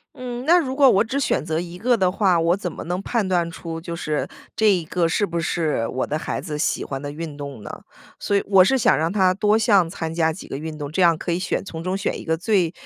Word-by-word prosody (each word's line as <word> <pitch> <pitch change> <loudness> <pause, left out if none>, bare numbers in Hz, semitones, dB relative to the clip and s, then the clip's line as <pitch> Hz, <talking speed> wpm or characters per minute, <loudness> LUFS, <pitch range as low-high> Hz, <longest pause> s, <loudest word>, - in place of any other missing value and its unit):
嗯， 250 -1 -6
那 345 +3 +6
如 265 -5 -3
果 275 -1 +6
我 205 -2 +4
只 260 +5 -2
选 145 - 0
择 160 0 -2
一 175 0 -7
个 240 +1 +2
的 185 -2 +2
话， 185 -3 +2
我 170 +2 +2
怎 185 -3 -4
么 - - -8
能 180 +3 -3
判 215 -1 -1
断 175 -2 +1
出 165 -1 -7
就 170 0 -5
是 155 -3 -2 0.3
这 220 -1 +4
一 175 -4 0
个 170 +1 0
是 185 +5 +1
不 170 -3 -3
是 155 -9 -1
我 130 - -2
的 155 - -2
孩 - - -3
子 155 -4 -5
喜 150 - -1
欢 135 -1 -5
的 145 0 -5
运 155 -1 -6
动 140 -6 -8
呢？ - - -7 0.5
所 200 - +1
以 - - 0
我 190 -2 +6
是 265 +8 +3
想 240 - +4
让 160 +3 0
他 190 -3 +3
多 210 +3 +2
项 205 -6 +3
参 160 -1 -5
加 160 -1 +2
几 175 - -9
个 - - -6
运 155 +1 -6
动， 145 -1 -6
这 185 - 0
样 170 -3 +5
可 170 - -3
以 170 - 0
选 190 - -2
从 165 -4 -7
中 185 +2 -1
选 - - -2
一 - - -8
个 160 0 0
最 185 -3 +1
175 Hz, 295 characters per minute, -22 LUFS, 160-200 Hz, 0.5 s, 那